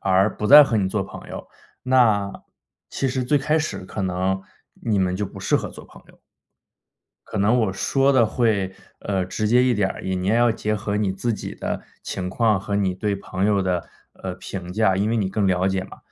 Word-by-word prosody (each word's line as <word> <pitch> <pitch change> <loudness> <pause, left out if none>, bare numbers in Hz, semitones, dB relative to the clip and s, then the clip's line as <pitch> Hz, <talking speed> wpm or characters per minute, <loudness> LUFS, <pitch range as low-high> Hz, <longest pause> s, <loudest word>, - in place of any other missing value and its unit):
而 95 +2 +2
不 105 - -2
再 145 +3 +10
和 120 - -1
你 95 -2 +1
做 100 +1 -1
朋 - - -11
友， - - -8 0.4
那 110 -6 +3 0.6
其 135 - -2
实 130 0 -1
最 145 +4 +2
开 155 +3 +1
始 155 - -3
可 95 - -6
能 95 +1 -1 0.4
你 105 -4 +1
们 90 -1 +1
就 105 +1 -2
不 95 - -11
适 - - 0
合 - - -3
做 - - -12
朋 - - -17
友。 - - -20 1.1
可 110 - -4
能 110 +5 +3
我 100 -4 0
说 135 +7 +2
的 125 -4 +5
会， 105 -4 0 0.3
呃， 95 -2 -1
直 105 +3 -2
接 125 +1 +5
一 125 -1 +3
点 100 -3 +1
儿， - - -7
你 95 0 -2
你 90 0 -2
也 105 - +3
要 120 0 +4
结 105 -1 -1
合 105 0 -2
你 105 -2 +1
自 115 +5 -2
己 - - -6
的 - - -4 0.2
情 90 -1 -4
况 110 +1 +2
和 100 +1 -5
你 95 -2 +1
对 105 0 -1
朋 95 0 -3
友 100 -2 +2
的， 90 -2 -1 0.3
呃， - - -6
评 90 -2 -7
价 95 -2 +2
因 100 +3 0
为 115 - +1
你 100 -4 0
更 100 +1 0
了 95 0 +2
解 95 -1 -1
嘛。 95 - -12
100 Hz, 240 characters per minute, -23 LUFS, 95-115 Hz, 1.1 s, 再